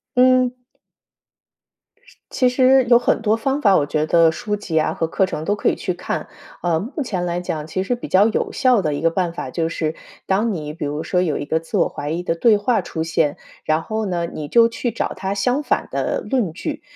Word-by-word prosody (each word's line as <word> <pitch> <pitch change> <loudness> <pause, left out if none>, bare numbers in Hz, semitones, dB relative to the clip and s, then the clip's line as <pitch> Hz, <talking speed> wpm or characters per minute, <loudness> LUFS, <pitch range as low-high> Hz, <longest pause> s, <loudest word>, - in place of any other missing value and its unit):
嗯。 255 0 +4 1.5
是 - - -21
其 255 -1 +2
实 260 +1 +4
有 240 - +8
很 240 -1 +1
多 220 0 +2
方 270 +5 -1
法， 200 -4 +5
我 145 - +1
觉 155 +1 -1
得 165 -1 +5
书 210 +5 -3
籍 170 -6 -1
啊 155 - 0
和 165 - -1
课 190 +4 +1
程 155 -4 -5
都 205 - +1
可 - - +1
以 - - 0
去 180 - -3
看。 175 - -4 0.4
呃， 170 -2 +1
目 260 - -4
前 185 -8 -3
来 175 0 -2
讲， 155 -4 -4
其 185 +4 -2
实 220 - -1
比 240 - -8
较 190 +2 +4
有 225 - -1
效 255 -5 +3
的 150 -5 -1
一 145 - -4
个 165 0 +2
办 180 -1 -1
法， 130 -6 -6
就 165 +4 -1
是 160 -1 -2 0.3
当 210 +4 +1
你 150 -5 -5
比 155 - -7
如 150 +2 -3
说 180 - 0
有 165 -5 0
一 145 - -4
个 160 +2 0
自 165 - -4
我 - - +3
怀 145 - -6
疑 170 +3 -2
的 170 - 0
对 215 +5 +4
话 225 +1 +1
出 160 -2 -4
现， 160 -2 0 0.3
然 155 +1 0
后 220 +2 -3
呢， 175 -2 -1
你 155 -3 -6
就 230 +9 +5
去 230 +1 -3
找 225 - -3
它 190 +1 -3
相 250 +8 +1
反 - - -1
的 - - -1
论 245 -10 -1
据。 - - -5
185 Hz, 250 characters per minute, -20 LUFS, 160-230 Hz, 1.5 s, 有